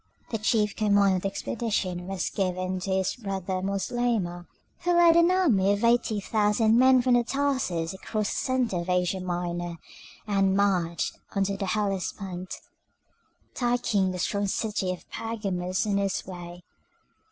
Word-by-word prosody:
The 225 Hz, -, -1 dB
chief 210 Hz, -1 st, +1 dB
command 200 Hz, -2 st, +3 dB
of -, -, -4 dB
the 195 Hz, -, -1 dB
expedition 195 Hz, -3 st, -2 dB
was 195 Hz, -1 st, -2 dB
given 185 Hz, -1 st, -1 dB
to 195 Hz, +1 st, -4 dB
his 190 Hz, 0 st, 0 dB
brother 190 Hz, -4 st, -3 dB
Moslemah, 195 Hz, -2 st, -1 dB, 0.3 s
who 350 Hz, 0 st, +1 dB
led 340 Hz, -1 st, +6 dB
an 340 Hz, +1 st, +5 dB
army 240 Hz, -, +3 dB
of 205 Hz, +2 st, -3 dB
eighty 235 Hz, -2 st, +2 dB
thousand 215 Hz, +2 st, +2 dB
men 260 Hz, -1 st, +6 dB
from 245 Hz, -1 st, +4 dB
Tarsus 260 Hz, -12 st, -1 dB
across 210 Hz, +2 st, -3 dB
the -, -, -3 dB
centre 255 Hz, -7 st, 0 dB
of 170 Hz, +1 st, -4 dB
Asia 180 Hz, +1 st, +1 dB
Minor, 175 Hz, -1 st, -3 dB, 0.5 s
and 195 Hz, -2 st, +2 dB
marched 180 Hz, -4 st, 0 dB, 0.2 s
on 195 Hz, -, +2 dB
the 195 Hz, 0 st, -2 dB
Hellespont, 190 Hz, -2 st, -3 dB, 1.0 s
taking 240 Hz, -6 st, +1 dB
the 185 Hz, -, -4 dB
strong 200 Hz, +3 st, -1 dB
city 200 Hz, -2 st, -1 dB
of 180 Hz, -, -8 dB
Pergamus 195 Hz, -4 st, -2 dB
on 205 Hz, -2 st, +1 dB
his 200 Hz, -1 st, -1 dB
way. 175 Hz, -1 st, -9 dB
195 Hz, 145 wpm, -27 LUFS, 185-225 Hz, 1.0 s, led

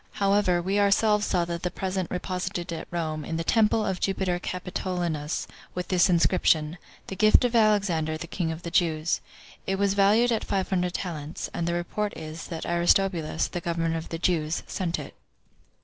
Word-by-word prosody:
However, 200 Hz, -3 st, +2 dB
we 195 Hz, +3 st, +1 dB
ourselves 210 Hz, +1 st, +3 dB
saw 175 Hz, -2 st, +1 dB
that 170 Hz, +1 st, -4 dB
present 190 Hz, -1 st, -2 dB
reposited 180 Hz, -1 st, -3 dB
at 165 Hz, -, -6 dB
Rome, 155 Hz, -3 st, -3 dB
in 160 Hz, -, -3 dB
the 165 Hz, -, -2 dB
temple 220 Hz, +3 st, +3 dB
of 190 Hz, -2 st, -2 dB
Jupiter 190 Hz, -2 st, 0 dB
Capitolinus, 180 Hz, -4 st, -3 dB, 0.3 s
with 180 Hz, 0 st, -4 dB
this 185 Hz, 0 st, +4 dB
inscription, 170 Hz, -2 st, +2 dB, 0.3 s
'The 195 Hz, -, -6 dB
gift 215 Hz, +4 st, +5 dB
of 240 Hz, -1 st, 0 dB
Alexander, 195 Hz, -8 st, +2 dB
the 170 Hz, -, -6 dB
king 165 Hz, -1 st, -2 dB
of 160 Hz, +1 st, -7 dB
the 170 Hz, -, -5 dB
Jews.' 165 Hz, -2 st, +1 dB, 0.5 s
It 195 Hz, -, 0 dB
was 200 Hz, 0 st, +2 dB
valued 210 Hz, +5 st, +4 dB
at 225 Hz, -, 0 dB
five 195 Hz, -2 st, -1 dB
hundred 180 Hz, -1 st, 0 dB
talents; 160 Hz, -4 st, -5 dB
and 170 Hz, -, -2 dB
the 170 Hz, -, 0 dB
report 205 Hz, +4 st, -3 dB
is, 155 Hz, +1 st, -7 dB
that 165 Hz, -2 st, -5 dB
Aristobulus, 170 Hz, -2 st, +2 dB
the 175 Hz, -, -5 dB
governor 165 Hz, -1 st, -1 dB
of 165 Hz, 0 st, -5 dB
the 165 Hz, -, -3 dB
Jews, 165 Hz, -2 st, 0 dB
sent 175 Hz, -3 st, -2 dB
it." -, -, -8 dB
180 Hz, 180 wpm, -26 LUFS, 165-195 Hz, 0.5 s, gift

